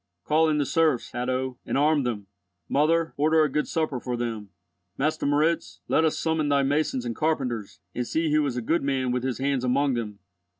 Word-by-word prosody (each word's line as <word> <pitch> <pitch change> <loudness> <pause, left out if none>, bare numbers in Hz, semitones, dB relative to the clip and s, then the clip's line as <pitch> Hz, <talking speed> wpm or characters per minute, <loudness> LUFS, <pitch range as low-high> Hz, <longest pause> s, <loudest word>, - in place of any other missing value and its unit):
Call 160 - +3
in 150 - +1
the 145 - +1
serfs, 155 -5 +1
Hatto, 130 +1 -2
and - - -2
arm 150 +1 +3
them. 115 -6 -3 0.4
Mother, 165 +3 +2
order 155 +2 +4
a 150 - 0
good 150 +2 0
supper 155 -5 -1
for 125 0 -3
them. 115 -4 -4 0.5
Master 150 +1 0
Moritz, 155 +3 0
let 160 - +3
us 155 - +1
summon 160 -2 0
thy 140 -1 +3
masons 140 -2 0
and 115 -1 -3
carpenters, 125 -9 -2
and 125 0 -3
see 160 -1 0
who 155 0 +4
is 125 -2 -3
a 120 - -2
good 165 +9 +1
man 135 -2 0
with 125 0 0
his 130 -1 -2
hands 135 -1 0
among 135 +2 +2
them." 110 -4 -4
140 Hz, 205 wpm, -26 LUFS, 125-155 Hz, 0.5 s, order